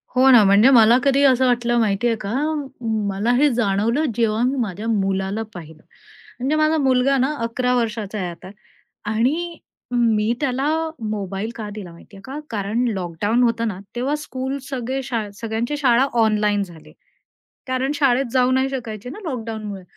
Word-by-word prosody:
हो 260 +1 +5
ना, 240 -4 +8
म्हणजे 200 +6 +6
मला 235 -2 +6
कधी 275 0 +3
असं 260 -2 +4
वाटलं 240 -1 +1
माहितीये 225 +2 +1
का, 200 - -4 0.8
मला 200 +4 0
हे 290 +4 +4
जाणवलं 230 +5 +1
जेव्हा 225 -1 +1
मी 255 +2 +1
माझ्या 215 -1 -3
मुलाला 195 0 -1
पाहिलं. 160 -4 -11 0.6
म्हणजे 270 +5 0
माझा 310 +1 +2
मुलगा 270 -1 +2
ना, 265 +3 +1
11 250 +2 0
वर्षाचा 220 -3 -2
आहे 180 -2 -2
आता. 170 +2 -10 0.6
आणि 310 +10 0 0.4
मी 225 -2 +2
त्याला 270 0 0 0.4
मोबाईल 200 0 -3
का 215 -2 -6
दिला 195 -5 -8
माहितीये 195 +4 -15
का, 275 +3 -6
कारण 215 +2 -1
लॉकडाउन 205 +3 0
होतं 230 -1 +1
ना, 195 -4 -4 0.2
तेव्हा 260 +5 0
स्कूल 265 -2 -4
सगळे 260 0 -3
शा 235 -2 -2 0.2
सगळ्यांचे 230 +5 -2
शाळा 260 -2 +3 0.2
ऑनलाईन 210 -2 +2
झाले. 170 -5 -13 0.8
कारण 260 +1 -1
शाळेत 275 -2 +2
जाऊ 255 0 +3
नाही 260 +1 +2
शकायचे 235 -4 -6
ना, 305 - -8
लॉकडाउनमुळे, 220 -6 -5
230 Hz, 155 wpm, -21 LUFS, 210-260 Hz, 0.8 s, ना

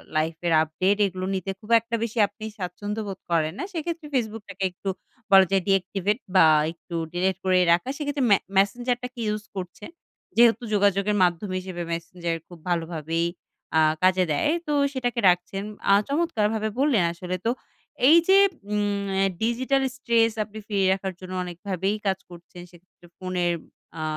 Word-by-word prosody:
লাইফের 165 +2 0
আপডেট 185 +6 0
এগুলো 185 -1 -3
নিতে, 190 +1 -4
খুব 215 - -14
একটা 230 +1 -4
বেশি 230 +1 -4
আপনি 205 +2 -10
স্বাচ্ছন্দ্য 205 +4 -4
বোধ 190 -1 -6
করেন 160 -1 +1
না। - - -2
সেক্ষেত্রে 330 -1 -4
Facebook 225 -3 -2
টাকে 195 0 -6
একটু 195 +2 -6 0.4
বলা 190 -1 +8
যায় 195 -1 +3
ডিঅ্যাক্টিভেট 195 +2 +1 0.2
বা 175 - +8 0.3
একটু 170 0 -10 0.2
ডিলিট 185 +1 0
করে 185 -1 +4
রাখা, 175 +9 0
সেক্ষেত্রে 290 -2 -2
ম্যা 200 - +7 0.2
Messenger 240 +6 +2
টা - - -1
কী 240 - -7
ইউস 210 0 -3
করছেন? 185 +2 -7 0.5
যেহেতু 235 0 +5
যোগাযোগের 200 0 +2
মাধ্যমে 185 +2 0
হিসেবে, 185 -2 -6
Messenger 170 0 -3
খুব 175 - -12
ভালোভাবেই 165 -1 -1 0.5
আ - - +6 0.2
কাজে 185 0 +4
দেয়। 150 - +1 0.2
তো 295 - 0 0.2
সেটাকে 245 -2 -1
রাখছেন 180 +2 -1 0.3
আ - - +8 0.2
চমৎকারভাবে 220 -9 0
বললেন 270 -10 +3
আসলে। 180 +1 -4
তো 235 - +3 0.6
এই 320 +4 +8
যে 385 +1 +7 0.4
উম 205 -1 0 0.4
ডিজিটাল 260 +4 +1
স্ট্রেস 230 -3 +2
আপনি 215 +1 -12
ফিরিয়ে 195 -3 +1
রাখার 190 0 -4
জন্য, 185 0 -8
অনেকভাবেই 190 +3 -3
কাজ 190 -1 +1
করছেন। 175 0 -12
সেক্ষেত্রে 175 0 -20
ফোনে 185 -1 -2 0.5
আ - - -3
195 Hz, 160 wpm, -25 LUFS, 180-225 Hz, 0.6 s, বলা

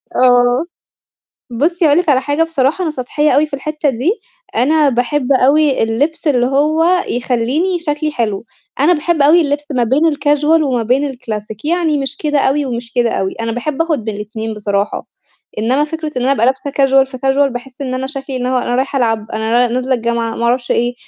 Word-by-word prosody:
آه. 245 +2 +3 0.9
بُصّي 325 +9 +1
هاقول 300 +2 +4
لِك 355 - 0
على 260 -2 +3
حاجة 290 +4 0
بصراحة 320 0 0
أنا 335 -4 -1
سطحية 295 +2 -1
أوي 295 - +3
في 295 - -25
الحتّة 300 +1 -2
دي، 260 +8 0 0.4
أنا 295 +5 +3
باحب 255 +2 -1
أوي 275 +1 +3
اللبس 280 +9 -1
اللي 250 -4 +2
هو 300 +5 +2 0.2
يخلّيني 260 +9 0
شَكلي 305 -1 -2
حلو، 225 -6 -2 0.3
أنا 305 +6 +4
باحب 330 0 0
أوي 310 +5 +6
اللبس 290 -1 -1
ما 250 -3 +1
بين 260 +6 +1
الcasual 295 +2 +2
وما 250 -5 0
بين 255 +6 +1
الكلاسيك 220 -4 -6
يعني 325 -2 +1
مش 275 0 -4
كده 295 -2 0
أوي 280 +2 +1
ومش 240 -2 -5
كده 240 -1 +2
أوي، 190 0 -1
أنا 230 0 -2
باحب 270 +6 -2
آخُد 325 -4 0
بين 220 -2 -3
الاتنين 220 +2 -5
بصراحة، 205 -1 -2 0.5
إنمّا 250 +7 +1
فكرة 310 0 -4
إن - - -1
أنا 260 +2 +2
أبقى 235 -4 +2
لابسة 265 +2 -1
casual 270 -1 +3
في 255 - -7
casual 270 +2 +1
باحس 250 +2 -8
إن 260 -2 -3
أنا 260 +1 -3
شَكلي 270 -1 -6
إن 250 - -3
هو 255 0 +1
أنا 245 0 -1
رايحة 270 +2 -1
ألعب، 225 -3 -1
أنا 225 +3 +1
ن 235 - -4
نازلة 255 +1 0
الجامعة 235 -1 -2
ما - - -4
أعرفش 245 +1 0
إيه. 240 +1 +1
265 Hz, 200 wpm, -16 LUFS, 240-295 Hz, 0.9 s, أوي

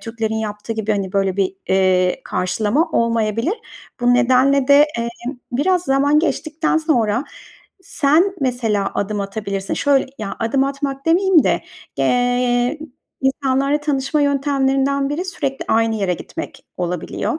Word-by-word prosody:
Türklerin 225 -1 -3
yaptığı 215 +1 -4
gibi, 220 -1 -1
hani, 195 -2 -2
böyle 195 -1 0
bir, 190 -1 0
eee, 185 +2 +2
karşılama 210 - 0
olmayabilir. 230 - 0 0.5
Bu 245 0 +4
nedenle 260 +2 +3
de, 285 +1 +7
eee, 235 - -1 0.4
biraz 345 +8 +1
zaman 280 +2 +3
geçtikten 310 -1 0
sonra 245 -6 +1 0.6
sen, 335 +4 +2
mesela, 230 -6 0
adım 205 +1 -2
atabilirsin. 195 -1 -4
Şö 280 -1 +3 0.2
ya 215 -2 -5
adım 250 +4 +1
atmak 275 0 -4
demeyeyim 355 -1 +4
de - - +1 0.4
ge - - -1
eee, 245 +2 +1 0.4
insanlarla 275 +2 +1
tanışma 295 0 0
yöntemlerinden 275 -1 +1
biri 335 +5 -2
sürekli 280 -7 -3
aynı 225 0 +2
yere 195 -4 0
gitmek 310 - -8
olabiliyor. 180 - -3
255 Hz, 130 wpm, -19 LUFS, 215-285 Hz, 0.6 s, de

